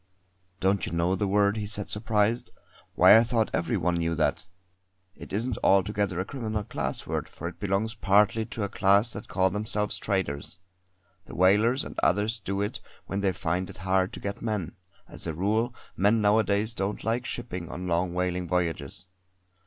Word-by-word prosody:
"Don't 95 -1 +1
you - - -5
know 85 +3 +1
the 100 +2 -1
word," 100 +1 +2
he 105 -1 -3
said 105 -1 -4
surprised. 110 +1 0 0.5
"Why - - +8
I 115 - +6
thought 115 -2 0
every 85 - 0
one 90 -1 0
knew 85 0 0
that. 85 +3 0 0.7
It - - -11
isn't 115 +6 -1
altogether 100 -1 +2
a 95 - -1
criminal 110 -4 -3
class 105 - -4
word, - - -3
for 85 - -7
it 90 - -8
belongs 105 +2 0
partly 105 +3 +3
to 115 -2 -4
a - - 0
class 100 +4 +3
that 105 - -8
call 95 -1 +1
themselves 105 +1 -1
traders. 95 -5 -2 0.7
The - - -10
whalers 105 +8 +3
and - - -6
others 105 +5 +1
do 100 -1 -3
it 105 - -2 0.3
when 100 - -3
they 100 -1 +2
find 90 +1 -2
it - - -9
hard 95 0 +2
to - - -7
get 100 0 -5
men; 105 -7 -2 0.4
as - - -7
a 80 - -3
rule 110 +7 +1 0.2
men 105 +4 +3
nowadays 105 +1 +2
don't 100 -1 -3
like 120 +3 -1
shipping 90 -8 -5
on 90 - -6
long 90 0 0
whaling 90 0 -1
voyages. 85 -2 -2
100 Hz, 180 wpm, -27 LUFS, 90-110 Hz, 0.7 s, Why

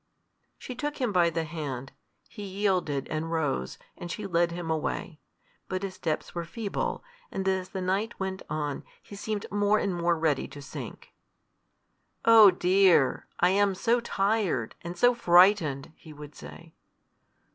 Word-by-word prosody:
She 255 - -7
took 295 +4 -4
him 250 -4 0
by 175 -3 +4
the 165 0 -2
hand. 145 -5 -5 0.4
He 210 - -11
yielded 190 -8 -1
and 155 +1 -3
rose, 145 - -1 0.2
and 175 - -8
she 210 +5 -5
led 170 -2 +1
him 170 -1 -4
away. 155 0 -3 0.5
But 185 +1 -3
his 195 -1 -3
steps 160 -4 -3
were 170 - -3
feeble, 205 - -3 0.3
and 195 0 -3
as 190 -1 0
the 190 -1 -5
night 195 +5 -1
went 190 0 -3
on, 150 -2 -3 0.2
he 200 - -11
seemed 205 +1 -4
more 205 +1 +3
and 200 -3 -1
more 170 0 +1
ready 155 -4 0
to 145 - -11
sink. 140 - -9 1.1
"Oh 225 -3 +9
dear! 180 -5 +3
I 180 +1 +5
am 200 0 +2
so 235 +5 +2
tired! 210 -3 0
and 175 +1 -7
so 245 +6 +5
frightened!" 175 - +4
he 155 - -13
would 150 0 -11
say. 165 -1 -12
180 Hz, 155 wpm, -28 LUFS, 160-200 Hz, 1.1 s, Oh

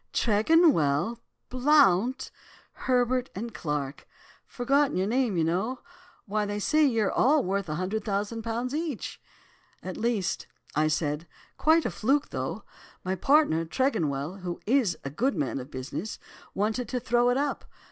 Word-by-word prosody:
Tregonwell, 220 - +3 0.3
Blount, 255 -4 +3 0.4
Herbert 250 0 0
and 225 +4 -5
Clarke. 150 -5 -4 0.4
Forgotten 275 0 +1
your 185 - +1
name, 235 -3 +1
you 165 - +2
know. 195 +10 -1 0.4
Why, 210 +1 -1
they 205 0 -3
say 305 +9 +2
you're 225 -6 +1
all 290 +1 +3
worth 195 +1 -1
£100,000 215 - -2
each?' 305 -6 -4 0.6
"'At 185 - -6
least!' 225 -5 -1 0.3
I 155 +1 +3
said; 155 +1 -1 0.3
'quite 320 +1 +3
a - - 0
fluke, 275 +6 +1
though. - - -4 0.4
My 185 - -1
partner, 230 - +3
Tregonwell, 165 - -1
who 180 -2 -5
is 230 -7 +2
a 135 - -5
good 245 - 0
man 140 -4 -1
of 130 +2 -8
business, 140 +10 -5 0.4
wanted 220 +3 -1
to 250 0 -1
throw 240 +1 +2
it 245 - +2
up. 285 0 -2
220 Hz, 135 wpm, -27 LUFS, 175-255 Hz, 0.6 s, Tregonwell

